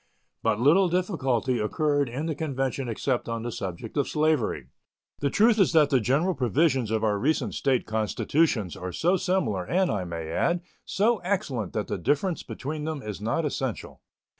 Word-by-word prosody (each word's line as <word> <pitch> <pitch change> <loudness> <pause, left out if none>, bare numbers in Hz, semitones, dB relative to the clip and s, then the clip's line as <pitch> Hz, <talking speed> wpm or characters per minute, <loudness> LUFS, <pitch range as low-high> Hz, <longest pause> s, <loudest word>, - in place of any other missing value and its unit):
But 110 -2 +1
little 170 +9 +5
difficulty 135 - 0
occurred 145 +5 +1
in 135 +6 -4
the 165 - -1
convention 135 -4 -2
except 120 +2 -1
on 115 -1 -3
the 120 - -3
subject 95 +2 -6
of 145 - +1
slavery. 150 - 0 0.5
The 140 - +1
truth 220 - +4
is 190 - +4
that 155 -3 +5
the 135 - +4
general 140 - +1
provisions 130 -2 +1
of 110 0 0
our 105 -2 +1
recent 130 -4 0
State 130 -3 +1
constitutions 110 - 0
are 90 0 -5
so 175 - +2
similar 180 - 0
and, 185 - +1
I 95 -4 -2
may 85 -2 -5
add, 170 - +1 0.2
so 220 +4 +2
excellent 175 - -2
that 105 - -1
the - - -4
difference 150 - 0
between 150 +2 -5
them 155 -3 -4
is 105 -2 -6
not 120 +9 0
essential. 135 -5 -4
135 Hz, 175 wpm, -26 LUFS, 110-160 Hz, 0.5 s, little